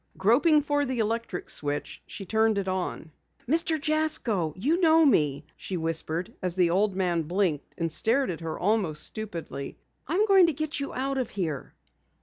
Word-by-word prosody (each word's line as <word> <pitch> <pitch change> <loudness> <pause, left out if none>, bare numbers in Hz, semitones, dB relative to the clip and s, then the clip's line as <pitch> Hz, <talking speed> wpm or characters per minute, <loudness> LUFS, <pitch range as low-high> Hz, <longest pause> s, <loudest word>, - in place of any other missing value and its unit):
Groping 295 - +4
for 290 0 +1
the 260 -2 -3
electric 225 -3 -2
switch, 145 0 -4
she 195 - -8
turned 220 +1 +2
it 195 -1 -2
on. 185 -3 -3 0.4
"Mr. 320 +3 +2
Jasko, 295 - +1
you 305 - +1
know 325 -1 +5
me," 150 - +2
she 185 - -5
whispered 165 +1 -1
as 180 -2 -3
the 180 -3 +3
old 195 +2 +1
man 180 -3 +1
blinked 170 -2 -2
and 165 -1 -2
stared 240 - +2
at 165 - -6
her 165 -1 -5
almost 185 -6 0
stupidly. 170 -10 -5 0.3
"I'm 365 +9 +2
going 385 -4 +6
to 330 - 0
get 310 +1 -3
you 280 - -4
out 270 +1 -2
of 250 - -2
here." 160 -8 -4
210 Hz, 170 wpm, -27 LUFS, 170-285 Hz, 0.4 s, going